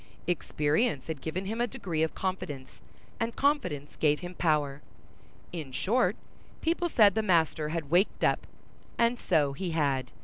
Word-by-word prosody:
Experience 155 - 0
had 160 -4 -5
given 180 +4 -3
him 225 +4 -2
a 240 - +2
degree 170 -7 -3
of 160 - 0
confidence, 150 -8 -4 0.4
and 230 0 -1
confidence 275 - 0
gave 150 -1 +2
him 175 0 -6
power. 150 -5 +1 0.7
In 155 -6 -6
short, 230 - +2 0.4
people 345 +1 0
said 210 - +6
the 220 - +1
master 160 -6 +2
had 155 -3 -4
waked 180 +4 +2
up; - - +2 0.5
and 235 +1 +2
so 150 -6 +2
he 175 +6 -3
had. 135 -4 0
170 Hz, 150 wpm, -29 LUFS, 150-215 Hz, 0.7 s, said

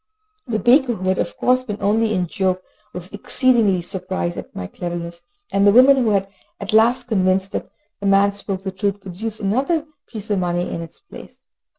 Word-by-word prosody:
The 225 -3 0
baker, 245 +1 +4
who 185 -1 -2
had 185 - +1
of - - -3
course 255 0 +2
been 210 -5 -5
only 220 +2 +1
in 185 -4 0
joke, 185 +1 -1 0.3
was 180 +2 -7
exceedingly 210 -4 +2
surprised 180 -1 -3
at - - -9
my 90 - -5
cleverness, 170 - -6 0.3
and 200 +1 +4
the - - +7
woman, 260 +5 +7
who 255 - +2
was 200 -3 +2 0.4
at 200 +1 -4
last 235 +4 +4
convinced 190 -4 +1
that - - -4 0.3
the 200 - -2
man 200 +1 +4
spoke 195 -1 -5
the 190 - -3
truth, 200 +1 -2
produced 210 +4 -6
another 270 - 0 0.2
piece 215 -2 -7
of 200 - +2
money 175 0 -1
in 170 - -4
its 165 -1 -11
place. 400 - -14
200 Hz, 195 wpm, -20 LUFS, 185-225 Hz, 0.4 s, the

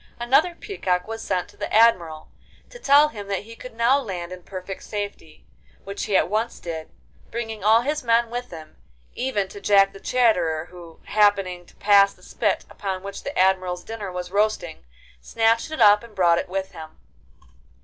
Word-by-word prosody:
Another 275 +9 +2
peacock 185 - -2
was 225 0 -6
sent 180 - -2
to - - -20
the - - -5
Admiral 175 -9 +3 0.4
to - - -11
tell 290 -4 +5
him 205 -8 -9
that 200 0 -2
he 230 +2 -12
could 250 0 -11
now 235 +4 +3
land 180 -8 -6
in 185 0 -8
perfect 185 +1 -8
safety, 205 -7 -7 0.4
which 200 +1 -5
he 195 - +2
at - - +2
once 220 +5 -2
did, 160 -2 -6 0.4
bringing 225 -3 -5
all 220 +2 +5
his 295 +4 -2
men 230 0 +2
with 245 +1 -5
him, 160 -2 -11 0.4
even 215 -7 -1
to 200 - -11
Jack 195 -1 +4
the 195 - -11
Chatterer, 180 -12 +1
who, 170 -2 -13
happening 195 -4 +1
to - - -21
pass 200 -1 +4
the - - -23
spit - - -1
upon 190 -2 -5
which 200 0 -7
the 280 - -6
Admiral's 185 -1 +1
dinner 215 -4 -6
was 180 0 -6
roasting, 200 - -1 0.4
snatched 225 - +1
it 315 - -6
up 210 -2 +6
and 230 -3 -14
brought 170 -2 +3
it - - -5
with 190 +1 -3
him. 155 -1 -11
200 Hz, 185 wpm, -23 LUFS, 180-230 Hz, 0.4 s, up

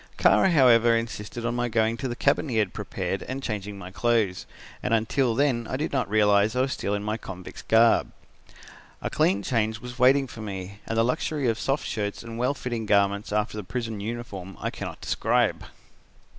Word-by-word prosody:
Kara, 190 - +5
however, 120 -7 +5
insisted 115 0 -5
on 120 - 0
my 120 0 0
going 110 0 +1
to 135 - -3
the 120 - -3
cabin 140 +3 +1
he 115 - -1
had 105 -4 +1
prepared 95 -2 -3
and 135 +1 -5
changing 105 -3 -4
my 95 -1 -9
clothes, 110 -3 0 0.3
and 115 - +1
until 115 +2 +1
then 125 -4 +1
I 130 - -2
did 150 - -2
not 130 -7 0
realise 105 0 +3
I 125 - +2
was 130 0 0
still 100 - -2
in 100 - -3
my 105 +1 -2
convict's 95 -4 -9
garb. 115 +1 +4 0.9
A - - -2
clean 100 +2 +2
change 110 -2 0
was 125 +2 -9
waiting 135 +2 +5
for 115 -3 -10
me, 100 -1 -6
and 115 - -2
the 115 - +4
luxury 135 +2 -1
of 115 0 0
soft 135 +2 -1
shirts 105 -3 -3
and 115 0 -7
well 125 +4 +1
fitting 120 -5 -4
garments 100 0 +2
after 105 +1 0
the 105 - -4
prison 115 +1 -4
uniform 100 -4 -6
I - - -2
cannot - - -7
describe. - - +1
115 Hz, 200 wpm, -26 LUFS, 105-125 Hz, 0.9 s, Kara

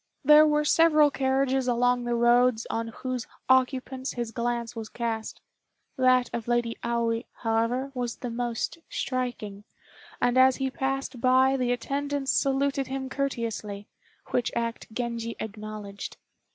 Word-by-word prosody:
There 300 +2 +8
were 300 0 +2
several 305 -2 +5
carriages 265 -1 +1
along 245 0 +2
the 240 0 0
roads 240 0 +3
on 230 0 -2
whose 250 +1 -5 0.2
occupants 260 0 +1
his 240 -2 -4
glance 235 0 -2
was 220 -1 -6
cast; 225 -2 -4 0.5
that 255 -2 +4
of 235 -1 -4
Lady 240 -1 0
Aoi, 235 0 0 0.2
however, 230 +4 0
was 245 -3 -3
the 245 - -6
most 240 +6 -3
striking, 240 -6 -3 0.6
and 245 +1 +3
as 260 0 +6
he 265 -1 -2
passed 270 -2 -3
by 260 +1 +4
the 250 -2 0
attendants 280 +3 -1
saluted 275 0 +1
him 265 0 -4
courteously, 230 -7 -3 0.5
which 245 - 0
act 230 -1 -3
Genji 230 0 -3
acknowledged. 210 -2 -7
245 Hz, 135 wpm, -27 LUFS, 230-265 Hz, 0.6 s, There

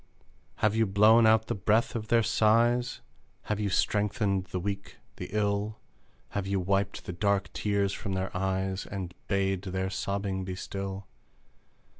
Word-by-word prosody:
Have 105 -1 +2
you 115 -1 +3
blown 110 +4 +6
out 110 0 +4
the - - -2
breath 105 +4 +1
of 110 -2 -3
their 115 0 +4
sighs? 120 +3 +2 0.4
Have 105 -1 -2
you 105 -1 0
strengthened 100 -1 +1
the 95 0 -4
weak, 100 +1 -4 0.2
the - - -6
ill? 105 +1 0 0.5
Have 100 -1 -3
you 100 0 0
wiped 100 +2 -1
the 90 - -5
dark 100 +2 0
tears 100 -1 0
from 100 - -4
their 95 0 -3
eyes, 95 0 -1
And 95 -3 -5
bade 95 -2 +1
their 95 0 -3
sobbing 100 -1 -2
be 95 0 -4
still? 95 0 -5
100 Hz, 155 wpm, -29 LUFS, 95-105 Hz, 0.5 s, blown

